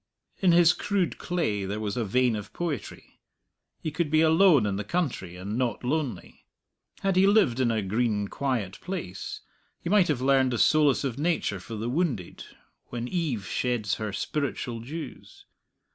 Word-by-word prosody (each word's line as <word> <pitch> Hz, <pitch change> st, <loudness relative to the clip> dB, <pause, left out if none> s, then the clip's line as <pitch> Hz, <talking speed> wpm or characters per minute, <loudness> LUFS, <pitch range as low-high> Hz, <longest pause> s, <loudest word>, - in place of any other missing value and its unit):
In 185 Hz, -3 st, +4 dB
his 170 Hz, 0 st, +6 dB
crude 200 Hz, -4 st, -1 dB
clay 160 Hz, -, -1 dB
there 100 Hz, +2 st, -3 dB
was 105 Hz, -2 st, -3 dB
a 120 Hz, -, 0 dB
vein 125 Hz, +3 st, +2 dB
of 105 Hz, 0 st, -6 dB
poetry: 170 Hz, -4 st, -5 dB, 0.6 s
he 155 Hz, -, -4 dB
could 155 Hz, 0 st, -1 dB
be 155 Hz, +1 st, +4 dB
alone 160 Hz, -, +5 dB
in 100 Hz, -1 st, -1 dB
the 105 Hz, -, -3 dB
country, 110 Hz, -, -2 dB
and 100 Hz, +6 st, -4 dB
not 125 Hz, -3 st, -1 dB
lonely; 130 Hz, -, -3 dB, 0.5 s
had 195 Hz, -1 st, +1 dB
he 190 Hz, +1 st, +5 dB
lived 200 Hz, -, +4 dB
in 125 Hz, -2 st, +3 dB
a 110 Hz, -2 st, 0 dB
green 105 Hz, 0 st, 0 dB
quiet 115 Hz, -7 st, -2 dB
place, 170 Hz, -, -5 dB, 0.4 s
he 170 Hz, -, -4 dB
might 205 Hz, -4 st, +5 dB
have 150 Hz, -5 st, 0 dB
learned 130 Hz, -1 st, +3 dB
the -, -, 0 dB
solace 150 Hz, +2 st, +4 dB
of 135 Hz, -2 st, -3 dB
nature 155 Hz, -, 0 dB
for 115 Hz, +5 st, -8 dB
the 110 Hz, +2 st, -3 dB
wounded 125 Hz, -, -2 dB, 0.4 s
when 120 Hz, 0 st, -4 dB
eve 145 Hz, -, -2 dB
sheds 115 Hz, -3 st, -1 dB
her 105 Hz, -1 st, -2 dB
spiritual 130 Hz, -1 st, -3 dB
dews. 145 Hz, +4 st, -9 dB
130 Hz, 170 wpm, -27 LUFS, 105-160 Hz, 0.6 s, his